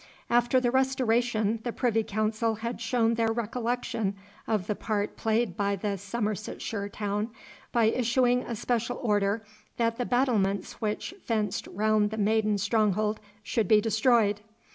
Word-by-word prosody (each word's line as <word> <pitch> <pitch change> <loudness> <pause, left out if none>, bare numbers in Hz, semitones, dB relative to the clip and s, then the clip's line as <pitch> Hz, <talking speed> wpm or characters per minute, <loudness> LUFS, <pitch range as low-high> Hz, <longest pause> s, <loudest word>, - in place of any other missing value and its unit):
After 240 +2 +4
the 245 -1 +1
Restoration 240 -4 +1
the 240 - -3
Privy 230 -2 +1
Council 215 +2 0
had 230 +2 -5
shown 230 0 +2
their 225 -1 +1
recollection 230 -2 -2 0.3
of 210 -5 0
the 210 - 0
part 210 0 -2
played 220 -3 0
by 200 0 0
the 200 +1 -2
Somersetshire 210 0 -3
town, 205 +1 -2 0.4
by 235 -2 +3
issuing 245 +2 +2
a 235 - -5
special 235 +2 -1
order 205 -1 +1 0.3
that 230 -1 +1
the 245 - 0
battlements 215 -8 +1
which 215 - -2
fenced 215 -4 -1
round 215 +1 +2
the 220 - -5
maiden 215 0 +2
stronghold 210 +1 +1 0.2
should 215 -1 0
be 215 +2 +6
destroyed. 220 -1 +2
220 Hz, 140 wpm, -28 LUFS, 210-235 Hz, 0.4 s, be